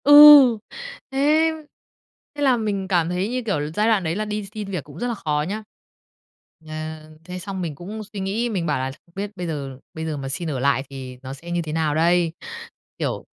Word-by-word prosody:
Ừ, 295 0 +11 0.7
thế! 305 +4 +3 0.8
Thế 290 - -5
là 260 -3 +4
mình 205 -4 -2
cảm 175 -3 +2
thấy, 180 +4 -1
như 250 +1 -1
kiểu 200 -9 0
là, 150 +1 -3
giai 210 +1 +2
đoạn 215 -4 +3
đấy 165 0 -1
là 215 +2 -2
đi 210 -1 -3
xin 210 -2 -5
việc 180 -7 -3
cũng - - -12
rất 245 - -1
là 240 - -1
khó 150 -6 -1
nhá, 215 +3 -4 1.0
ờ, 155 - -7 0.5
thế 180 +1 -6
xong 190 0 -5
mình 160 -4 -3
cũng 205 +8 -7
suy 205 - -4
nghĩ, 205 +5 -1
mình 190 -6 -2
bảo 150 -4 0
là 130 +1 -2
"Không 170 - -28
biết 200 +1 -4
bây 175 -1 -3
giờ 140 -5 -5
bây 160 0 -5
giờ 155 -2 -3
mà 135 -1 -5
xin 165 +4 -2
ở 135 - -2
lại 135 0 +2
thì 130 -2 -8
nó 130 +1 -6
sẽ 170 +5 -9
như 175 0 0
thế 155 -2 -5
nào 155 -2 0 1.0
Kiểu - - -2
180 Hz, 220 wpm, -23 LUFS, 150-215 Hz, 1.0 s, Ừ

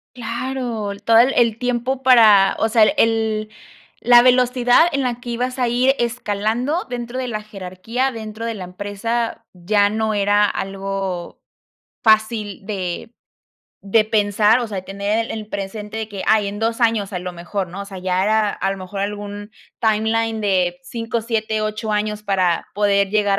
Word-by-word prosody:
Claro, 235 -2 -4
el 200 - -10
todo 225 0 +5
el 255 +3 +4
el 230 -2 +2
tiempo 250 +1 -1
para, 220 -7 +6
o 220 - +2
sea, 225 -1 +5
el 215 - +4
el 220 -2 +1 0.5
la 240 0 +7
velocidad 250 +4 +4
en 275 -3 -1
la 245 -1 -2
que 245 0 -9
ibas 250 +2 -3
a 250 - +2
ir 250 +3 +3
escalando 240 - -1
dentro 240 +1 -5
de 255 - -3
la 215 -3 -3
jerarquía, 210 +6 -3
dentro 220 -1 -7
de 230 - -2
la 195 - -7
empresa, 205 +5 -3
ya 205 +3 +2
no 220 +1 -1
era 205 0 +3
algo 195 -3 -4 0.6
fácil 215 -3 +1
de 195 +1 -4 0.7
de 215 +2 +2
pensar, 210 +1 +3
o 240 - -2
sea, 210 -3 -6
de - - -5
tener 200 +3 -2
el - - -10
el 215 -1 -6
presente 210 +2 -5
de 220 - -4
que: 200 -3 -6
"Ay, 215 -2 +3
en 205 - -6
2 225 +2 -1
años, 225 -4 +1
a 180 - -2
lo 180 0 -6
mejor", 175 +2 -4
¿no? 190 +4 -7
O - - -8
sea, 195 -2 -9
ya 185 0 0
era 215 0 +2
a 195 - -2
lo 195 - -7
mejor 190 +1 -6
algún 205 +1 -5 0.3
timeline 220 0 +1
de 185 -4 +1
5, 230 +4 -3
7, 220 -1 -2
8 215 0 -3
años 210 0 -2
para 185 -4 0
poder 200 -1 +2
llegar 205 -2 +2
215 Hz, 180 wpm, -20 LUFS, 200-230 Hz, 0.7 s, la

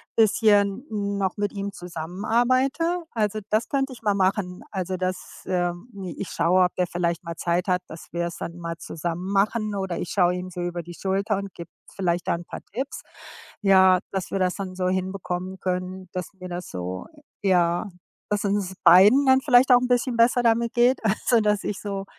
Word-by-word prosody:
bisschen 210 0 +3
noch 200 -3 -2
mit 205 0 -1
ihm 200 0 -4
zusammenarbeite. 240 - 0
Also, 215 -2 -1
das 215 +2 +1
könnte 270 -1 0
ich 235 - -13
mal 205 -3 +1
machen, 185 -1 0
also, 185 -2 -3
dass, 185 0 -4
ähm, 175 +3 -2
i 180 -3 -6
ich 195 - -4
schaue, 185 +2 +3
ob 180 - -3
der 180 -1 0
vielleicht 170 0 -2
mal 170 -1 -6
Zeit 175 +2 -1
hat, 180 -1 +1
dass 160 - -10
wir's 170 0 -3
dann 170 +1 -6
mal 170 -1 -5
zusammen 175 +4 -4
machen 210 +1 +1
oder 190 -3 -3
ich 175 - -4
schaue 180 -2 +2
ihm 180 0 -5
so 180 0 -6
über 175 0 -3
die 175 +1 -10
Schulter 195 +2 -1
und 200 -1 -6
gebe 170 -1 -9 0.3
vielleicht 175 -2 -1
da - - +2
'n 170 +1 -8
paar - - -8
Tipps. 265 +5 -4 0.6
Ja, 190 -2 +6
dass 190 -2 -4
wir 195 - -1
das 180 -1 +1
dann 190 -2 -6
so 185 -1 -1
hinbekommen 185 0 -3
können, 185 0 -3
dass 180 0 -5
mir 185 -2 -9
das 175 0 -6
so 90 +1 -5 0.4
j 195 -2 +2
ja, 175 +1 +2 0.4
dass 210 0 0
es 200 - 0
uns 200 -2 -1
beiden 195 +11 +7
dann 260 0 +6
vielleicht 255 -1 +5
auch 245 - +8
'n 250 - -1
bisschen 245 0 +1
besser 240 +2 +4
damit 230 0 +2
geht, 245 +2 +4
also 220 +3 +2
dass 210 -1 +1
ich 205 - -3
so 195 -1 -4
190 Hz, 200 wpm, -24 LUFS, 180-215 Hz, 0.6 s, auch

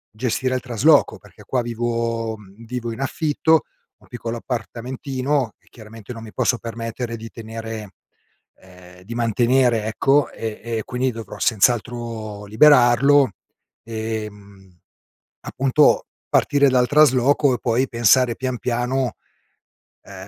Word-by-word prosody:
gestire 130 +2 -1
il 130 - -2
trasloco 130 +5 +3
perché 105 0 -18
qua 125 -2 0
vivo 115 -1 -2
mhmm, 105 +2 -16
vivo 120 0 -4
in 115 - -10
affitto, 155 +3 -1
ho 160 - +4 0.4
un - - -22
piccolo 120 -1 -5
appartamentino 130 +2 -3
e - - -34
chiaramente 110 0 -12
non 115 -1 -9
mi 110 - -10
posso 125 - +1
permettere 115 +1 -5
di 115 +1 -9
tenere 110 -2 -7 0.7
ehm, 90 -1 -17
di 115 +4 -8
mantenere, 120 0 +2
ecco, 135 +6 +2
e 110 -1 -6
e 115 -1 -3
quindi 130 0 -1
dovrò 110 -2 -9
senz'altro 115 -2 0
liberarlo 130 +2 +5 0.5
e, 110 -1 -4
mhmm, 100 -3 -18 0.6
appunto, 135 +3 +2 0.3
partire 140 -1 +3
dal 125 -1 +3
trasloco 145 -1 +4
e - - -7
poi 125 +2 0
pensare 120 +1 +3
pian, 130 0 -3
piano, 125 0 -1 0.9
ehm, - - -13
115 Hz, 130 wpm, -21 LUFS, 110-130 Hz, 0.9 s, liberarlo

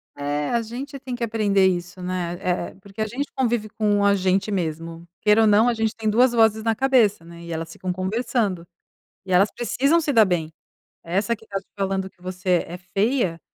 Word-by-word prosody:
É 145 +1 -2
a 235 - +1
gente 260 +5 -7
tem 255 -2 -5
que 240 - -4
aprender 210 -4 +2
isso, 180 0 -3
né, 180 -1 -3
é - - -2 0.2
é, - - -19
porque 200 +2 -15
a 215 - 0
gente 265 +7 -4
convive 235 -4 0
com 205 -1 +1
a 200 0 +5
gente 190 +1 +1
mesmo, 165 -2 -4
queira 210 +1 +5
ou 220 - +5
não 215 +3 +5
a - - +2
gente 220 -1 -1
tem 220 -1 -1
duas 240 +3 +4
vozes 220 -2 +3
na 225 0 +1
cabeça, 235 -8 +3
né, 170 0 -12
e 170 - -8
elas 165 +1 -5
ficam 185 +1 -4
conversando, 190 -2 -1 0.6
e 185 - -3
elas 195 +3 +4
precisam 275 +7 +1
se 300 -3 -1
dar 225 -4 +6
bem. 170 -4 -1 0.5
Essa 195 +7 0
que 220 - -19
estava 195 -2 -5 0.2
falando 190 -1 -1
que 180 - -37
você 185 -1 0
é 175 - -7
feia, 190 0 0
200 Hz, 210 wpm, -23 LUFS, 180-230 Hz, 0.6 s, dar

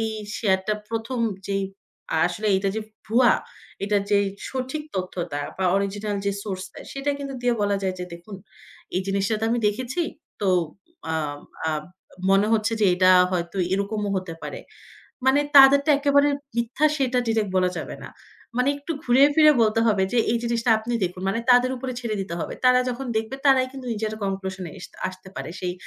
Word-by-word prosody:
এই 225 - 0 0.3
শেয়ার 190 -4 +2
টা 215 - +3 0.2
১ম 230 +2 -3 0.3
যেই 195 0 -1 0.5
আ - - +2
আসলে 210 +5 -4
এইটা 195 +1 +1
যে 220 - -1 0.3
ভুয়া, 240 +3 +5 0.5
এইটা 205 0 +2
যেই 200 0 +3 0.2
সঠিক 260 +3 -3
তথ্যটা 175 -5 -3 0.2
বা 190 - -1
অরিজিনাল 200 +1 -2
যে 200 - +2
সোর্সটা 190 -3 -6
সেটা 275 +1 -1
কিন্তু 275 -1 -5
দিয়ে 245 -1 +2
বলা 205 0 +1
যায় 190 -1 -1
যে, 180 - -4
"দেখুন, 190 +4 -10 0.6
এই - - +2
জিনিসটা 195 +2 0
তো 225 - 0
আমি 240 - +1
দেখেছি। 255 +9 -2 0.4
তো 200 - +1 0.6
আম 150 -2 -2 0.3
আম 155 -1 -1 0.5
মনে 195 +2 +4
হচ্ছে 225 +1 +2
যে 205 - +5
এটা 185 0 +5 0.2
হয়তো 170 +1 -2 0.2
এরকমও 200 +1 -1
হতে 185 -3 -4
পারে।" - - -6 0.7
মানে 270 +2 +5 0.2
তাদেরটা 280 +2 +8
একেবারে 285 0 +4 0.3
মিথ্যা 240 +6 +1
সেটা 255 -3 +1
ডিরেক্ট 220 -3 0
বলা 185 -1 +3
যাবে - - -6
না। - - -8 0.5
মানে 250 +2 +2
একটু 285 +4 -5
ঘুরিয়ে 265 +4 +6
ফিরিয়ে 305 -2 +7
বলতে 220 +1 +2
হবে 205 -3 +3
যে 245 - +2
এই 235 - +1
জিনিসটা 235 0 0
আপনি 235 +2 -5
দেখুন। 180 +1 -4
মানে 205 +4 0
তাদের 250 +1 +5
উপরে 255 +1 -4
ছেড়ে 235 -3 -2
দিতে 190 -3 -4
হবে। - - -4
তারা 250 0 +6
যখন 250 +2 -4
দেখবে 225 +5 -2
তারাই 260 -1 +5
কিন্তু 265 -2 -9
নিজেরা 215 0 -3
conclusion 190 -1 -3
এস - - -8 0.2
আসতে 185 0 -12
পারে। - - -5
সেই 180 -1 -2
215 Hz, 180 wpm, -24 LUFS, 190-250 Hz, 0.7 s, তাদেরটা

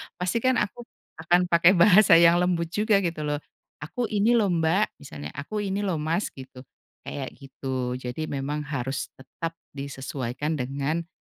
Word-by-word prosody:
pastikan 230 +9 +1
aku 240 +2 -2 0.3
akan 175 +2 +2
pakai 170 +3 +6
bahasa 190 +1 +7
yang 170 +1 +6
lembut 175 -2 +1
juga 210 0 +3
gitu 165 -3 -2
loh. 145 0 -1 0.4
"Aku 235 +10 -3
ini 210 +2 +3
lho 220 -3 +3
Mbak," 170 +5 +1
misalnya, 75 - -8
"Aku 150 +10 -4
ini 195 0 -2
lho 190 -4 0
Mas," 165 +6 0
gitu 130 -1 -11 0.4
kayak 135 -2 -5
gitu, 130 -2 -4
jadi, 125 +5 -5
memang 140 +1 -3
harus 135 -2 -3
tetap 165 +5 -7 0.2
disesuaikan 140 +1 -4
dengan 140 +6 -2
160 Hz, 150 wpm, -26 LUFS, 135-185 Hz, 0.4 s, bahasa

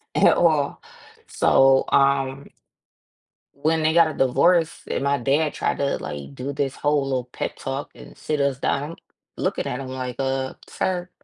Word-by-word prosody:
at - - +5
all. 155 -4 +2 0.5
So, 135 0 +4
um 135 0 +1 1.0
When 160 +3 0
they 155 0 +3
got 170 -1 +5
a - - -8
divorce 160 +6 +2
and - - -2
my 140 0 +2
dad 145 +4 +1
tried - - -1
to, 140 0 0
like, 70 -1 -7
do 140 +2 -5
this 140 -1 -2
whole 145 -1 +1
little 130 -2 -2
pep - - -4
talk 135 +2 -4
and - - -13
sit 150 -1 -2
us 140 -2 0
down, 145 +3 -1
I'm - - -9 0.4
looking - - -1
at 125 - -3
him, 135 - -6
like, 130 -1 -5
"Uh, 135 -1 -1
sir, 180 -1 -2
140 Hz, 170 wpm, -23 LUFS, 135-150 Hz, 1.0 s, at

